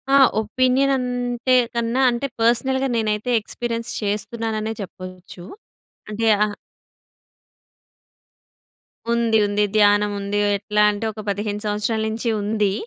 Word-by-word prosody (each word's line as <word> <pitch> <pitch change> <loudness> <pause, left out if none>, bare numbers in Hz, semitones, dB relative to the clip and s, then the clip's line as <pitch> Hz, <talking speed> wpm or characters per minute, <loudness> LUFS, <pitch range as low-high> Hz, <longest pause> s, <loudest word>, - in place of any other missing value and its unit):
ఆ! - - +7 0.2
ఒపీనియన్ 255 +5 +1
అంటే 245 0 -1 0.2
కన్నా 235 +3 0
అంటే 240 +4 -2
పర్సనల్‌గా 265 +3 +2
నేనైతే 215 +1 -1
ఎక్స్‌పీరియెన్స్ 230 +1 -4
చేస్తున్నాననే 215 +1 -3
చెప్పొచ్చు. 185 -1 -10 0.7
అంటే 225 +2 -2 0.2
ఆ - - +1 2.7
ఉంది, 230 -1 +2
ఉంది 205 +1 +1
ధ్యానముంది. 205 -1 +2 0.2
ఎట్లా 210 +1 +1
అంటే 205 +2 -4
ఒక 215 - -11
15 205 +1 -3
సంవత్సరాల్నుంచి 220 +2 -1
ఉంది. 205 -1 0
220 Hz, 100 wpm, -21 LUFS, 205-240 Hz, 2.7 s, ఆ